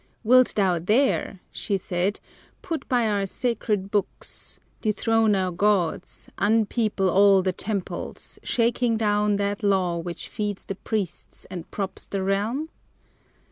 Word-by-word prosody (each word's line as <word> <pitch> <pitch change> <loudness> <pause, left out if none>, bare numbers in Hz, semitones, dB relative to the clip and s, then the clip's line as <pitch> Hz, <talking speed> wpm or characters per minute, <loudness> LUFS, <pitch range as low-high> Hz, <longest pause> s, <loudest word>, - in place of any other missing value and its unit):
"Wilt 255 +2 +5
thou 185 -4 +2
dare," 210 - +1
she 200 - -1
said, 185 +2 -1 0.4
"Put 330 -4 -4
by 245 -4 +3
our 200 -2 0
sacred 210 -3 -1
books, 205 -2 -2 0.2
dethrone 220 0 +2
our 185 -1 0
gods, 185 -2 0
Unpeople 215 -1 +2
all 195 +1 +5
the 185 -1 0
temples, 200 0 -5
shaking 235 -1 +1
down 210 -1 +2
That 200 +1 -1
law 190 -4 +2
which 170 0 -6
feeds 205 -2 -4
the - - -3
priests 200 -2 -4
and 175 -3 -7
props 195 -2 -4
the 195 -1 -2
realm?" 215 +11 0
205 Hz, 130 wpm, -25 LUFS, 190-225 Hz, 0.4 s, Wilt